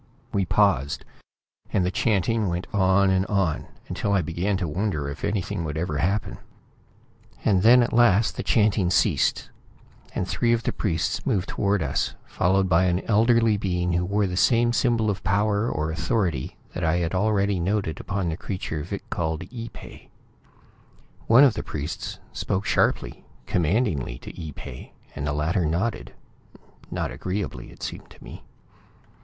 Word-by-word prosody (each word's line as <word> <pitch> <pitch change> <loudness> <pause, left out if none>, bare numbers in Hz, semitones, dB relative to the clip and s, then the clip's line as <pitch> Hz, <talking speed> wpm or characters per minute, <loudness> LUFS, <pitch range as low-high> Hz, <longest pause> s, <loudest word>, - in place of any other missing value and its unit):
We 100 -1 +1
paused, 85 -9 +1 0.7
and 90 - +2
the 90 - 0
chanting 110 +1 +1
went 90 0 -2
on 95 0 +4
and 95 0 +2
on, 95 -6 0 0.2
until 100 - -1
I 95 -3 +2
began 90 +5 -1
to 90 -2 -2
wonder 80 -3 -2
if 70 +2 -7
anything 100 -4 -1
would 75 -1 -4
ever 80 -3 -2
happen. 100 +6 -1 1.1
And 95 -3 +4
then, 120 +4 +7
at - - -2
last 115 -2 +4
the - - -3
chanting 105 -4 +2
ceased, 90 - +1 0.6
and 90 - -1
three 115 +6 +1
of 115 -1 0
the - - -1
priests 95 -1 -1
moved 100 -9 0
toward 100 -3 0
us, 65 - -1
followed 95 +2 +1
by 90 +1 +4
an 90 +1 +1
elderly 115 0 +3
being 90 -3 -1
who 85 +1 +1
wore 100 +3 +1
the 90 -1 -3
same 120 +5 +3
symbol 120 -3 +2
of 95 - -6
power 105 +3 +1
or 75 +1 -2
authority 85 - -1 0.2
that 90 - -4
I 80 +1 +2
had 85 -1 -1
already 100 -1 +1
noted 95 -2 -1
upon 95 -2 -2
the 80 - -3
creature 90 -6 -4
Vic - - -6
called 80 -2 -2
Ee 115 -1 -6
pay. - - -13 1.2
One 120 +5 +7
of 135 -5 +6
the - - -3
priests 75 +2 -5 0.2
spoke 95 +2 -2
sharply, - - 0 0.2
commandingly, 85 - 0
to - - -11
Ee 80 -3 -6
pay, 65 -2 -10 0.2
and 70 - -3
the - - 0
latter 80 +5 0
nodded 85 - -2 0.7
not - - -3
agreeably 95 +1 -4
it - - -13
seemed - - -6
to - - -16
me. - - -10
95 Hz, 165 wpm, -25 LUFS, 85-105 Hz, 1.2 s, then